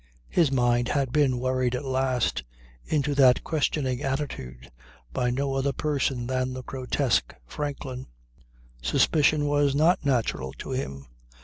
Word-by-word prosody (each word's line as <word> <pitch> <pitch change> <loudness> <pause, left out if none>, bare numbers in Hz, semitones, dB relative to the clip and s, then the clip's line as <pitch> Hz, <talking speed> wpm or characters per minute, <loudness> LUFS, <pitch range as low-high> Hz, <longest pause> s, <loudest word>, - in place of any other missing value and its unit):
His 165 -6 +3
mind 120 -2 +2
had 135 -2 0
been 140 -3 +2
worried 130 0 0
at 130 +3 -4
last 130 -2 0 0.4
into 145 -1 0
that 130 -3 +5
questioning 140 -4 -1
attitude 65 - -4 0.4
by 125 - 0
no 135 +2 -1
other 135 +1 0
person 135 -4 -1
than 130 0 -1
the 130 0 -6
grotesque 130 0 -1
Franklin. 135 - -5 0.7
Suspicion 145 - +3
was 145 -1 +2
not 160 +4 +3
natural 115 - 0
to - - -8
him. 70 - -4
130 Hz, 130 wpm, -26 LUFS, 125-145 Hz, 0.7 s, that